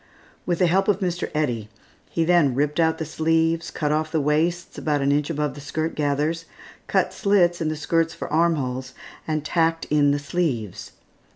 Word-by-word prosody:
With 175 -1 +1
the 180 - +3
help 190 +3 +2
of 205 -2 +2
Mr. 175 -3 -2
Eddy, 120 -8 -1 0.4
he 165 - 0
then 165 -7 +3
ripped 150 +3 0
out 160 -1 +3
the 160 - -3
sleeves, 165 +1 +1
cut 150 -1 -2
off 155 +1 0
the 160 - +1
waists 160 +4 0
about 150 -2 0
an 140 - +2
inch 145 +1 +1
above 150 -3 -1
the 145 - -10
skirt 160 +3 -3
gathers, 150 +3 -1 0.4
cut - - +1
slits 180 -4 +2
in 160 - 0
the 155 - -2
skirts 165 +2 0
for - - -5
arm 170 +1 +3
holes, 130 -2 -4 0.3
and 155 -1 -1
tacked 165 0 +1
in 145 -1 +4
the 145 - +2
sleeves. 140 - -3
155 Hz, 190 wpm, -23 LUFS, 145-165 Hz, 0.4 s, in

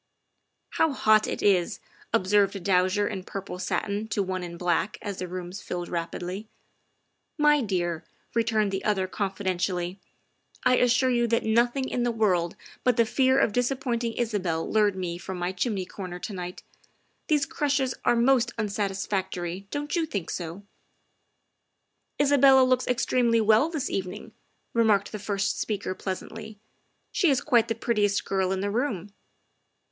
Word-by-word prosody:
' - - -50
' - - -51
How 320 -3 +4
hot 215 -4 +4
it - - -4
is! 185 -4 +2 0.2
" - - -29
observed 200 +1 +3
a - - -3
dowager 185 +2 +2
in 195 -4 -4
purple 195 -1 -6
satin 200 +3 -2
to 210 -2 0
one 185 -1 -3
in 170 -1 -7
black 175 +3 0
as 200 -3 -4
the 180 - -3
rooms 180 +1 -6
filled 175 -1 -5
rapidly. 180 +4 -4 0.4
" - - -49
My 295 -1 +5
dear," 175 -6 -1 0.3
returned 220 -3 +1
the 195 0 -3
other 200 -3 +1
confidentially, 185 -2 -2 0.3
" - - -45 0.3
I 255 0 +4
assure 255 +1 +3
you 240 -1 +2
that 230 0 +1
nothing 240 +4 +2
in 250 - -2
the 240 - +1
world 185 -7 +1 0.3
but 250 -2 +2
the 230 - +5
fear 260 +3 +3
of 230 -6 +3
dis 245 +1 +2
appointing 240 -4 -2
Isabel 195 -9 -1
lured 210 -2 +2
me 175 -2 -4
from 190 0 -6
my 175 +1 -1
chimney 190 0 -2
corner 180 -2 -7
to 200 - -6
night. 180 -1 -6 0.6
These 295 -2 +2
crushes 275 -3 0
are 240 - +3
most 240 0 +3
unsatisfactory, 195 -3 -2
don't 290 +2 -3
you 330 -2 0
think 200 - -4
so?" 175 +3 -5 0.8
" - - -51
Isabel 275 -2 +6
looks 255 0 +2
extremely 240 -1 +2
well 220 +7 +4
this 310 -5 -2
evening," 190 +2 -4 0.4
remarked 215 -4 +3
the 215 - -5
first 200 -1 -1
speaker 205 -3 -2
pleasantly; 210 +3 -6 0.3
" - - -46
she 360 -5 +3
is 270 -3 +3
quite 235 -2 +3
the 225 - -1
prettiest 210 -3 +1
girl 190 -1 0
in 190 0 -1
the 205 +1 -1
room. 210 -5 -2
205 Hz, 170 wpm, -26 LUFS, 185-240 Hz, 0.8 s, Isabel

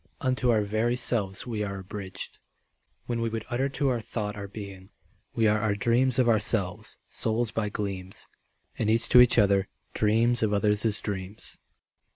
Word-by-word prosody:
Unto 130 -2 0
our 110 -3 +3
very 110 +4 0
selves 105 -6 0
we 110 -4 -3
are 100 -1 -4
abridged 95 0 -7 0.7
When 120 -1 -2
we 115 - 0
would 110 -1 -4
utter 130 +3 0
to 140 0 0
our 120 -3 -1
thought 105 -1 -4
our 100 -1 -6
being. 100 -2 -9 0.5
We 115 -2 +3
are 105 0 +3
our 105 -2 +1
dreams 120 +4 +2
of 125 -2 +3
ourselves, 105 -4 +1
souls 115 0 -1
by 110 -1 -2
gleams, 95 -2 -5 0.5
And 110 - +1
each 115 +1 +3
to 125 - +8
each 125 -1 +5
other 100 -2 +3 0.3
dreams 115 +3 +2
of 110 -2 +1
others' 105 +1 +2
dreams. 100 0 -5
110 Hz, 170 wpm, -27 LUFS, 100-120 Hz, 0.7 s, to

